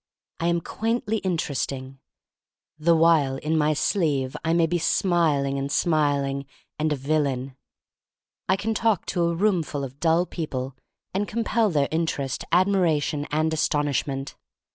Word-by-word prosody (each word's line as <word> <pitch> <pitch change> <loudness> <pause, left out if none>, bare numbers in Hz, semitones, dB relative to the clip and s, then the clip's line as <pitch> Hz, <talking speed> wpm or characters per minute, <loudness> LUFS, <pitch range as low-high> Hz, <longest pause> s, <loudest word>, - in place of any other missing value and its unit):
I 170 - 0
am 170 0 +1
quaintly 225 +3 -1
interesting 135 -7 -3 0.4
— - - -52
the 170 - +7
while 160 -5 +4
in 155 +3 -1
my 155 -1 +3
sleeve 145 -7 0
I 165 - +1
may 170 0 +4
be 175 +2 0
smiling 155 -6 +1
and 140 +1 -3
smiling 140 -4 +1
— - - -43
and 155 0 +1
a - - +2
vil 150 +3 +1
lain. 135 -2 -3 0.9
I 190 - +5
can 215 +3 -2
talk 220 -3 +1
to 175 -2 0
a 170 0 0
roomful 170 -7 0
of 135 +1 -8
dull 165 +1 +3
people 135 -7 -4 0.4
and 200 +2 -1
compel 225 0 +1
their 145 -5 +1
interest, 150 -5 -1
ad 180 +2 +5
miration, 155 -6 +1
and 155 +1 +1
astonishment. 145 -2 -1
155 Hz, 155 wpm, -25 LUFS, 140-175 Hz, 0.9 s, the